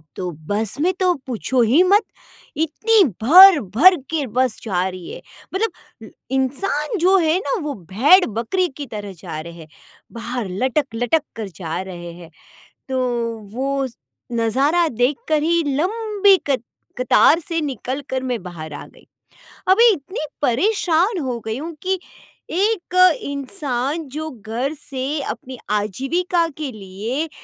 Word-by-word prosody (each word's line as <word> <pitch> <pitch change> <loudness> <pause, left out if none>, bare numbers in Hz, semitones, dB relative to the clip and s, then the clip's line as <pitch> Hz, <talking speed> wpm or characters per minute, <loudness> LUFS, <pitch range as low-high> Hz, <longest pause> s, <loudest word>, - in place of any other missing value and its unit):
तो 180 -1 -4 0.2
बस 210 +4 -2
में 360 - +3
तो 365 -1 +3
पूछो 250 +1 0
ही 260 +10 +4
मत, 400 +4 +4 0.5
इतनी 400 +7 +3 0.2
भर-भर 340 - +8 0.2
के 310 -3 0
बस 250 0 0
जा 185 -4 0
रही 185 -2 -9
है। - - -9 0.3
मतलब 450 +4 -5 0.2
इंसान 290 - -1
जो 370 +3 +4
है 325 0 +2
ना 430 - -3
वो 295 -1 -3 0.2
भेड़-बकरी 285 - +3
की 290 - -5
तरह 205 -3 -7
जा 155 - -6
रहे 170 +1 -9
है, 165 -2 -12 0.4
बाहर 235 -2 -5
लटक-लटक 255 - 0 0.2
कर 220 - -4
जा 165 +1 -4
रहे 175 -2 -8
है, 170 -1 -12 0.6
तो 260 -1 -1 0.6
वो 275 +1 -1 0.5
नज़ारा 270 +9 +2
देखकर 280 +5 0
ही 335 +1 +2
लंबी 410 +2 +3
कत 260 -4 +1 0.4
कतार 275 +6 +5
से 330 0 -2
निकल 265 -1 -4
कर 260 0 -1
मैं 250 -5 -3
बाहर 165 -4 -8
आ - - -8
गई। - - -21 0.6
अभी 460 +5 +7
इतनी 310 +1 -5 0.2
परेशान 355 - +2
हो 245 -2 -3
गई 220 +1 -3
हूँ 330 +2 -6
कि 375 0 0 0.5
एक 385 0 -1 0.3
इंसान 280 0 -3
जो 315 0 -3
घर 240 +4 -4
से 275 +2 -3
अपनी 260 0 -9
आजीविका 270 - 0
के 300 -4 -4
लिए 215 +10 -4
275 Hz, 140 wpm, -20 LUFS, 225-340 Hz, 0.6 s, भर-भर